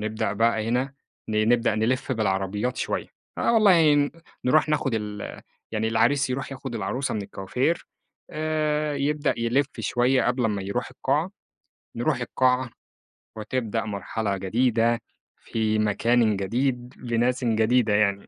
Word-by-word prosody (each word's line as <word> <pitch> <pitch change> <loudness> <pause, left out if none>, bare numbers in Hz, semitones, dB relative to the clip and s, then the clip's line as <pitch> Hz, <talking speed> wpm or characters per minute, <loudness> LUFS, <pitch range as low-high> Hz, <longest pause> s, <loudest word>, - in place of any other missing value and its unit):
نبدأ 110 -1 -2
بقى 110 +1 +1
هنا 130 +4 0 0.3
ن 110 0 +1
نبدأ 120 -2 +3
نلف 120 +5 0
بالعربيات 105 +1 -1
شوية، - - -2 0.3
آه - - +2
والله 180 -9 +6
ن 145 0 +2 0.3
نروح 155 +5 +4
ناخد 150 -3 +1
ال 105 -2 -5 0.3
يعني 110 0 0
العريس 120 +5 +2
يروح 135 +2 -3
ياخد 135 -2 -6
العروسة 115 +5 -2
من 105 - -2
الكوافير، 125 - -2 0.4
آآ 155 -1 -1
يبدأ 145 +1 0
يلف 120 +4 +1
شوية 120 +5 +2
قبل 125 0 +1
امّا 105 -3 0
يروح 120 +6 -3
القاعة، 150 +7 -1 0.7
نروح 125 +2 0
القاعة، 125 +1 +1 0.7
وتبدأ 115 0 -2
مرحلة 105 0 -3
جديدة، 115 +4 +1 0.4
في 110 -1 -1
مكانٍ 110 +1 +2
جديد، 125 +5 -1
لناسٍ 125 +1 0
جديدة 115 0 +3
يعني. 100 -1 +1
120 Hz, 130 wpm, -25 LUFS, 110-135 Hz, 0.7 s, والله